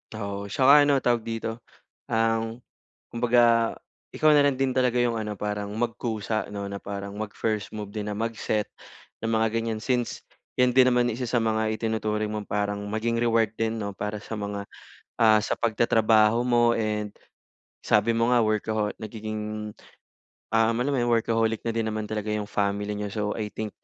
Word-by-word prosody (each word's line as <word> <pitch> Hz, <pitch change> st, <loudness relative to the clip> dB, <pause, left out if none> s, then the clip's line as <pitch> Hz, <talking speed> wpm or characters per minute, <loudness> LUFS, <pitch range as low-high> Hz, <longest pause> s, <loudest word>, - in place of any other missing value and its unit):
Oo, 100 Hz, -1 st, -4 dB
tsaka 140 Hz, +7 st, +6 dB
ano 140 Hz, -2 st, +2 dB
tawag 120 Hz, -1 st, +3 dB
dito, 115 Hz, 0 st, -4 dB, 0.5 s
um, 115 Hz, 0 st, 0 dB, 0.5 s
kumbaga 120 Hz, -1 st, +4 dB, 0.4 s
ikaw 155 Hz, -1 st, +4 dB
na 145 Hz, -, +6 dB
lang 140 Hz, -2 st, +2 dB
din 135 Hz, -1 st, +1 dB
talaga 125 Hz, -2 st, +2 dB
'yong 120 Hz, -1 st, +2 dB
ano 105 Hz, -2 st, -4 dB
parang 105 Hz, 0 st, -3 dB
magkusa 110 Hz, -3 st, -2 dB
'no, 100 Hz, -1 st, -5 dB
na 100 Hz, 0 st, -6 dB
parang 100 Hz, 0 st, -6 dB
mag-first 105 Hz, 0 st, -3 dB
move 105 Hz, -1 st, -7 dB
din 105 Hz, -1 st, -3 dB
na 105 Hz, -, -4 dB
mag-set 110 Hz, -2 st, -1 dB, 0.6 s
ng 115 Hz, -, -1 dB
mga 110 Hz, 0 st, +2 dB
gan'yan, 115 Hz, -1 st, -1 dB
since 120 Hz, +2 st, -2 dB, 0.3 s
'yan 125 Hz, -1 st, +4 dB
din 130 Hz, 0 st, +6 dB
naman 125 Hz, -1 st, +3 dB
isa 125 Hz, -, -5 dB
sa 125 Hz, -, +2 dB
mga 110 Hz, -1 st, +1 dB
itinuturing 110 Hz, -1 st, -1 dB
mong 105 Hz, -1 st, -5 dB
parang 105 Hz, 0 st, -1 dB
maging 110 Hz, +2 st, -1 dB
reward 115 Hz, -2 st, +2 dB
din 115 Hz, 0 st, -1 dB
'no 100 Hz, -2 st, -4 dB
para 105 Hz, +2 st, -4 dB
sa 110 Hz, -, -7 dB
mga, 100 Hz, -1 st, -4 dB, 0.5 s
ah, 110 Hz, -1 st, +6 dB
sa -, -, -2 dB
pagtatrabaho 110 Hz, -1 st, +3 dB
mo 120 Hz, -1 st, +4 dB
and 105 Hz, -2 st, -2 dB, 0.7 s
sabi 105 Hz, +2 st, +2 dB
mo 115 Hz, +1 st, +1 dB
nga 120 Hz, -, +4 dB
workaho 110 Hz, 0 st, 0 dB
nagiging, 110 Hz, 0 st, -5 dB, 0.8 s
um, 115 Hz, +1 st, +3 dB
alam 140 Hz, -, -1 dB
mo 140 Hz, -, 0 dB
'yong 120 Hz, -1 st, +2 dB
workaholic 115 Hz, -1 st, +1 dB
na 115 Hz, -, -1 dB
din 115 Hz, -1 st, 0 dB
naman 110 Hz, -1 st, -3 dB
talaga 105 Hz, -1 st, -3 dB
'yong 105 Hz, -1 st, -4 dB
family 100 Hz, 0 st, -1 dB
niyo. 105 Hz, -, -3 dB
So, 105 Hz, +1 st, -3 dB, 0.2 s
I 105 Hz, -1 st, -3 dB
think 110 Hz, -1 st, -4 dB
110 Hz, 175 wpm, -26 LUFS, 105-115 Hz, 0.8 s, tsaka